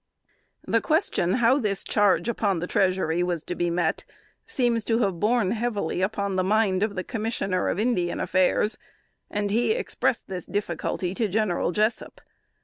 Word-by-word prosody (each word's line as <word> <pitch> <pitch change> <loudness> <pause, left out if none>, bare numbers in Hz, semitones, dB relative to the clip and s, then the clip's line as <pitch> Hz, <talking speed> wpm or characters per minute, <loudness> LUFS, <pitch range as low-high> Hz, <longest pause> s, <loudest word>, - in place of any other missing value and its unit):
The - - +1
question 305 - +1
how 250 +4 +3
this 200 -5 -1
charge 205 +1 +2
upon 205 -5 0
the 170 - -2
treasury 185 -3 +1
was 175 -3 -1
to - - -4
be 175 0 -1
met, 170 -1 0 0.4
seems 240 -3 +1
to 225 - +2
have 190 -4 -1
borne 215 -1 +2
heavily 215 -7 -2
upon 200 0 -1
the 185 - +2
mind 195 -1 +2
of 210 -1 0
the 185 - -2
Commissioner 215 -5 -2
of - - -1
Indian 205 -6 0
Affairs, 185 +3 +1 0.5
and 205 -1 -2
he 240 - +2
expressed 445 - -1
this 180 -3 -6
difficulty 180 -2 -2
to 220 +2 0
General 200 -4 0
Jessup. 215 +5 -1
200 Hz, 160 wpm, -25 LUFS, 180-225 Hz, 0.5 s, how